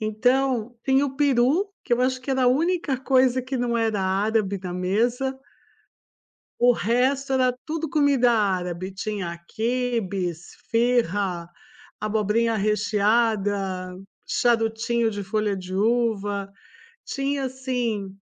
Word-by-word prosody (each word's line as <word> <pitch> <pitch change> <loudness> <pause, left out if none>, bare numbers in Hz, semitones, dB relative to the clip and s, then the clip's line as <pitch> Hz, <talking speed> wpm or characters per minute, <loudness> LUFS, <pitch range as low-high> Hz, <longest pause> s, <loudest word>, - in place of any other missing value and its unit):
Então, 245 +2 +1
tem 265 0 +3
o 270 -2 -2
peru, 290 +7 +2
que 245 - -4
eu 240 - +3
acho 255 0 0
que 265 - -6
era 265 -1 +1
a - - +4
única 310 +1 +1
coisa 260 -1 +3
que 260 +1 -4
não 240 -1 0
era 225 -3 0
árabe 200 +1 0
na 180 - -4
mesa 235 +9 0 1.2
o 245 +1 +6
resto 260 +5 +1
era 255 -1 +3
tudo 320 0 -3
comida 280 -6 +3
árabe, 185 -4 -1
tinha 195 -4 -4
quibes, 220 -8 -2
esfiha, 205 -7 0 0.5
abobrinha 215 +2 +1
recheada, 205 -3 +1 0.3
charutinho 225 0 +1
de 205 -1 -4
folha 215 0 -1
de 185 0 -6
uva, 205 -2 0 0.6
tinha 275 0 -2
assim 245 -7 -3
230 Hz, 120 wpm, -24 LUFS, 205-255 Hz, 1.2 s, o